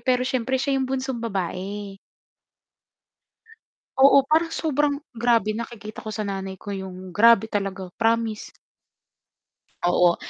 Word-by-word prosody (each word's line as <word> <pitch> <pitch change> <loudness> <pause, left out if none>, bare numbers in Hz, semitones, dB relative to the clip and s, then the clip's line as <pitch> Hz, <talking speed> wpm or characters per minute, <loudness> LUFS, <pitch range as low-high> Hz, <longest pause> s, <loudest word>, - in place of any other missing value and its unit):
pero 250 -1 +1
siyempre 260 0 0
siya 270 0 0
yung 260 - -1
bunsong 260 -2 -2
babae. 195 -1 -4 2.0
Oo, 275 +1 +7
parang 325 +1 +2
sobrang 295 -2 0 0.2
grabe 230 -3 +2
nakikita 220 -2 -7
ko 215 - -5
sa 215 - -4
nanay 195 -2 -4
ko - - -12
yung 185 -2 -7
grabe 225 0 +6
talaga, 195 -3 -3
promise. 225 -1 0 1.3
Oo. 175 0 +4
225 Hz, 115 wpm, -24 LUFS, 195-260 Hz, 2.0 s, Oo